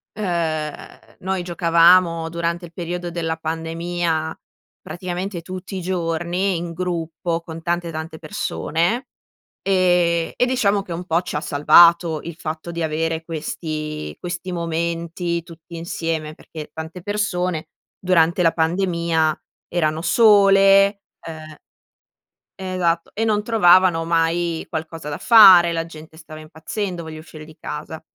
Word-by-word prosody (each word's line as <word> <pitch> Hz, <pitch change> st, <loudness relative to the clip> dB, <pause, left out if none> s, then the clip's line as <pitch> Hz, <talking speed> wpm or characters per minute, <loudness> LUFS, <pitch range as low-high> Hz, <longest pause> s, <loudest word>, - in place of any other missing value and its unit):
ehm, 165 Hz, -6 st, -4 dB
noi 190 Hz, 0 st, -2 dB
giocavamo 170 Hz, -1 st, +4 dB
durante 170 Hz, +1 st, -3 dB
il 170 Hz, -, -15 dB
periodo 175 Hz, 0 st, -5 dB
della 165 Hz, -1 st, -3 dB
pandemia, 165 Hz, 0 st, -3 dB, 0.4 s
praticamente 180 Hz, +1 st, -5 dB
tutti 185 Hz, +3 st, -7 dB
i 185 Hz, -, -4 dB
giorni 175 Hz, +1 st, -1 dB
in 170 Hz, 0 st, -5 dB
gruppo 170 Hz, -1 st, -3 dB
con 165 Hz, -1 st, -9 dB
tante, 170 Hz, +1 st, -2 dB
tante 160 Hz, 0 st, -6 dB
persone. 170 Hz, -, -2 dB, 0.6 s
Ehm, 175 Hz, -3 st, +2 dB
e 250 Hz, -, +2 dB
diciamo 210 Hz, -6 st, +1 dB
che 180 Hz, -3 st, -8 dB
un 175 Hz, +2 st, -5 dB
po' 165 Hz, +1 st, +1 dB
ci 180 Hz, -, -5 dB
ha -, -, -1 dB
salvato 165 Hz, +2 st, +5 dB
il 170 Hz, -1 st, -7 dB
fatto 160 Hz, +1 st, -6 dB
di 170 Hz, 0 st, -3 dB
avere 160 Hz, +1 st, -2 dB
questi 155 Hz, -, -5 dB
questi 175 Hz, +1 st, -5 dB
momenti 170 Hz, 0 st, -2 dB
tutti 170 Hz, 0 st, -12 dB
insieme, 165 Hz, -2 st, -4 dB
perché 155 Hz, -2 st, -10 dB
tante 160 Hz, +3 st, -8 dB
persone 180 Hz, -5 st, -2 dB, 0.3 s
durante 180 Hz, -1 st, +2 dB
la 165 Hz, -1 st, +4 dB
pandemia 170 Hz, -2 st, 0 dB, 0.3 s
erano 160 Hz, -2 st, -1 dB
sole, 195 Hz, 0 st, +5 dB, 0.2 s
ehm 155 Hz, -1 st, -9 dB, 1.1 s
Ehm, 185 Hz, -1 st, -4 dB
esatto, 170 Hz, -2 st, 0 dB
e 225 Hz, -, -2 dB
non 215 Hz, -2 st, +1 dB
trovavano 185 Hz, -6 st, +4 dB
mai 165 Hz, 0 st, 0 dB
qualcosa 160 Hz, 0 st, -6 dB
da 145 Hz, -, -4 dB
fare, 190 Hz, -7 st, +8 dB
la 165 Hz, 0 st, -2 dB
gente 160 Hz, -1 st, -13 dB
stava 155 Hz, -1 st, -11 dB
impazzendo: 170 Hz, +3 st, -5 dB
"Voglio 160 Hz, -1 st, -8 dB
uscire 155 Hz, -1 st, -12 dB
di 155 Hz, -, -15 dB
casa". -, -, -7 dB
170 Hz, 130 wpm, -21 LUFS, 160-180 Hz, 1.1 s, fare